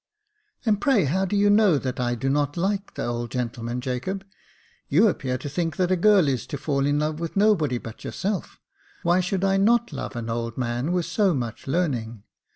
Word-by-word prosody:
" 420 -5 -37
And, 210 -3 +2
pray, 260 - +3
how 185 +8 +1
do 195 - -2
you 205 0 +4
know 205 -6 +5
that 130 -2 -4
I 120 -1 0
do 120 +3 -3
not 145 +2 0
like 195 +3 -1
the - - -3
old 120 0 -3
gentleman, 120 -1 -3
Jacob? 135 +10 -3 0.6
You 185 +11 +5
appear 130 -9 -1
to 130 - -7
think 165 +3 -2
that 185 -1 +1
a - - +4
girl 195 -2 +5
is 130 -5 -1
to 145 - -4
fall 140 0 0
in 145 0 +2
love 150 +1 -1
with 165 +2 -4
nobody 180 - +3
but 115 -1 -9
yourself. 195 0 -3 0.4
Why 175 +2 +3
should 185 +1 -1
I 195 0 +3
not 235 +4 +3
love - - -5
an 115 -1 -4
old 115 0 -3
man 120 +4 -1
with 180 -2 0
so 195 -6 +2
much 120 -2 -5
learning 125 - -1
155 Hz, 210 wpm, -24 LUFS, 125-195 Hz, 0.6 s, know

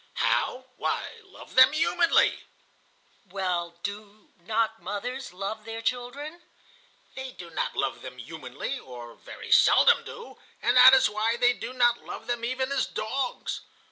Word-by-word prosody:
"How? 255 +1 0
Why, 460 - -3
love 390 - -15
them 260 +2 +7
humanly." 335 +2 +2 0.8
"Well, 175 -3 -3
do 205 +1 -8
not 220 +4 -1
mothers 225 +8 -5
love 200 +4 -5
their 225 +1 -7
children?" 275 +8 -4 0.7
"They 265 -1 -7
do 175 -2 -11
not - - -3
love - - -2
them - - -9
humanly, - - -6
or 120 -2 -10
very - - -11
seldom 475 - +6
do, 470 -2 -11 0.2
and - - +1
that 255 +1 +10
is 260 - +4
why 215 +2 -1
they 245 0 +4
do 245 - -7
not 240 -2 +2
love - - -8
them 240 -1 -3
even 260 +2 -2
as 275 - 0
dogs. 260 - -3
240 Hz, 145 wpm, -27 LUFS, 205-260 Hz, 0.8 s, that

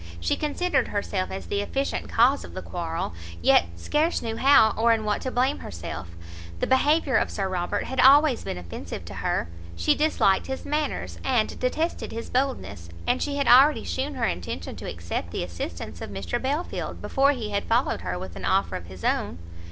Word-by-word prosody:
She 85 - +1
considered 300 -3 0
herself 200 -2 -2
as 190 - -6
the 200 - -1
efficient 275 +7 -2
cause 250 +5 +4
of - - -11
the 185 - -5
quarrel, 165 - -3 0.3
yet 85 +1 +5
scarce 300 - 0
knew 225 -1 -3
how 265 -5 +6
or 230 +1 +3
in 220 -1 -1
what 210 -1 0
to 260 - -2
blame 255 +3 +1
herself; 85 0 -6 0.5
the - - +1
behaviour 280 -1 +3
of - - +1
Sir 195 -2 -2
Robert 180 -2 -1
had 265 - -4
always 280 0 +6
been - - -4
offensive 85 -1 -7
to - - -8
her; - - -1 0.3
she 85 0 +3
disliked 300 -10 +2
his 265 0 -5
manners, 300 -1 -2
and 245 -5 0
detested 315 +7 -1
his 230 +1 -6
boldness; 255 - -2 0.2
and - - +1
she 290 -1 -1
had 280 -1 0
already 275 +5 +7
shewn 275 +2 -3
her 245 -3 0
intention 90 - -4
to - - -6
accept 85 +1 -4
the 85 - -3
assistance 85 -1 -6
of - - -5
Mr 95 -3 -3
Belfield 290 +6 -3
before 275 +1 +2
he 225 -6 -5
had 200 0 -1
followed 230 - +1
her 90 0 -3
with 90 -1 -7
an 95 - -8
offer 95 -1 +1
of 85 - -6
his 95 0 -11
own. 80 - 0
225 Hz, 195 wpm, -25 LUFS, -, 0.5 s, already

